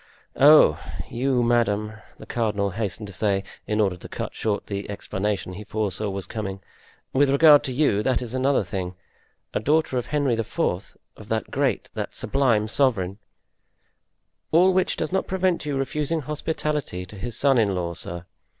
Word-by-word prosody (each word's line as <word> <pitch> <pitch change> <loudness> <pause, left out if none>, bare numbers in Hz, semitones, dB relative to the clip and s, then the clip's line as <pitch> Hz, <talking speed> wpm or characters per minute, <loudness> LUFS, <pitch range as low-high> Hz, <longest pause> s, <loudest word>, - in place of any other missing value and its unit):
"Oh, 145 - +7 0.3
you, 125 0 +1
madame," 110 -3 +1 0.2
the - - -11
cardinal 105 -4 -1
hastened 105 +2 -3
to 100 - -9
say, 100 0 0 0.2
in 105 0 0
order 100 -4 +2
to - - -11
cut - - -5
short 105 -2 -2
the 100 0 -5
explanation 100 -1 -3
he 105 +4 -7
foresaw 105 -1 -2
was 95 -1 -4
coming, 100 -4 -5 0.5
"with 140 +1 +4
regard 145 +1 +7
to 135 - -2
you, 125 -6 +2
that 130 +2 +1
is 125 -1 -6
another 130 -1 +2
thing. 95 -2 -4 0.6
A - - +1
daughter 150 -3 +1
of 120 - -6
Henry 145 -4 +1
IV., 115 -2 -4 0.6
of - - -13
that - - -2
great, - - 0
that - - -5
sublime 120 -6 +1
sovereign——" 110 -6 +1 1.3
"All 180 +4 +5
which 185 0 +1
does - - -2
not 190 - 0
prevent 185 -4 0
you 140 -2 -1
refusing 150 +4 -1
hospitality 150 - -3
to 95 - -12
his 120 +3 -4
son 135 -3 +4
in 100 -4 +2
law, 85 -1 -2
sir! 85 +1 -7
115 Hz, 170 wpm, -24 LUFS, 100-140 Hz, 1.3 s, Oh